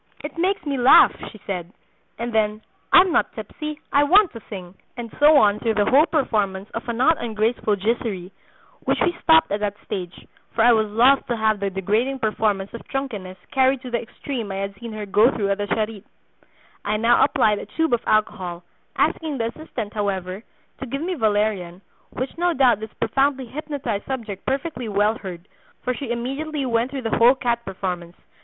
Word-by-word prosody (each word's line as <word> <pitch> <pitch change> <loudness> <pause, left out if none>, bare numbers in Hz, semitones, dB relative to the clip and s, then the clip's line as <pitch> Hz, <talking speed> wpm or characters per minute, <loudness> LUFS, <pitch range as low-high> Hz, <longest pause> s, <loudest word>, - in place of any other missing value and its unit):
'It 295 -1 -6
makes 365 +1 0
me 280 -2 -1
laugh,' 245 +2 +7
she 215 - -14
said, 180 -3 -4 0.5
and 235 0 -4
then, 215 -1 +1 0.3
'I'm 370 0 +7
not - - +1
tipsy, 305 -1 -6
I 285 - +5
want 370 +5 +5
to 230 - -9
sing,' 185 -4 -8 0.2
and 235 -2 -7
so 295 +1 +7
on 210 -5 +4
through 225 -2 0
the 205 - +2
whole 295 +5 +6
performance 205 - 0
of 230 +1 -6
a - - 0
not 265 +7 +3
ungraceful 220 -1 0
giserie, 200 -3 -2 0.5
which - - -1
we 350 -1 +2
stopped 320 -5 +5
at 205 - 0
that 205 -1 -2
stage, 180 -2 -6 0.3
for 225 - +3
I 240 - +7
was 220 -1 +1
loth 245 +6 +4
to 240 - -1
have 220 -1 +1
the 200 0 -1
degrading 210 +8 0
performance 215 -4 -1
of 235 - -9
drunkenness 210 -9 -5
carried 265 -1 +2
to 250 - -7
the 235 - 0
extreme 235 -2 -6
I - - -4
had 195 0 -3
seen 235 -1 -7
her 215 -1 -5
go 210 +4 +4
through 200 -6 -1
at 200 - -1
the 205 - -2
Charite. 215 -1 -2 0.8
I 210 +1 0
now 230 +2 +4
applied 210 -1 +2
a - - -8
tube 320 -4 -1
of 235 - +2
alcohol, 185 -5 0 0.3
asking 310 -4 0
the 230 -1 -1
assistant, 235 -9 -6
however, 195 -2 -3 0.4
to 265 - -6
give 275 +5 -4
me 365 +2 -1
valerian, 205 - 0 0.3
which 255 +2 -5
no 350 -1 +1
doubt 255 -5 +4
this 220 0 -7
profoundly 270 -1 0
hypnotized 265 -5 -4
subject 225 -7 -5
perfectly 265 -3 -2
well 210 +2 +1
heard, 180 -1 -8 0.4
for 250 - 0
she 260 0 -6
immediately 275 +5 -3
went 235 0 +1
through 270 -1 -5
the 225 - 0
whole 240 +3 +7
cat 235 -2 -1
performance. 180 -2 -5
230 Hz, 190 wpm, -22 LUFS, 205-270 Hz, 0.8 s, laugh